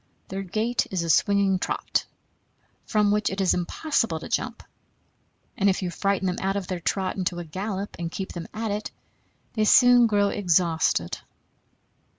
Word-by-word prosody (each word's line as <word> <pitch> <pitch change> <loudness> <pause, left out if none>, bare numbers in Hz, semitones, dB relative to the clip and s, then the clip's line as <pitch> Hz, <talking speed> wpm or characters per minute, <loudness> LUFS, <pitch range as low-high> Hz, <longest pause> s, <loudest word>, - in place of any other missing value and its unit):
Their 195 +1 -4
gait 215 +6 -1
is 185 -3 -1
a 165 - +2
swinging 200 +1 +3
trot, - - -1 0.8
from 210 -2 +2
which 210 0 +1
it 190 - -5
is 190 -2 +3
impossible 180 - -1
to - - -8
jump; 240 0 -2 0.9
and 200 -5 +3
if 190 0 0
you 180 - -2
frighten 195 +1 0
them 180 -1 -1
out 195 +1 0
of 200 -2 -2
their 180 -1 -4
trot 190 +3 -1
into 180 -2 -1
a 175 - -5
gallop 195 +4 -4
and 170 -1 -3
keep 190 +1 -5
them 170 -1 -6
at 220 -1 -3
it, 210 +1 -3 0.6
they 215 - +1
soon 245 +2 +6
grow 205 -2 +2
exhausted. 170 - +1
195 Hz, 165 wpm, -25 LUFS, 180-210 Hz, 0.9 s, soon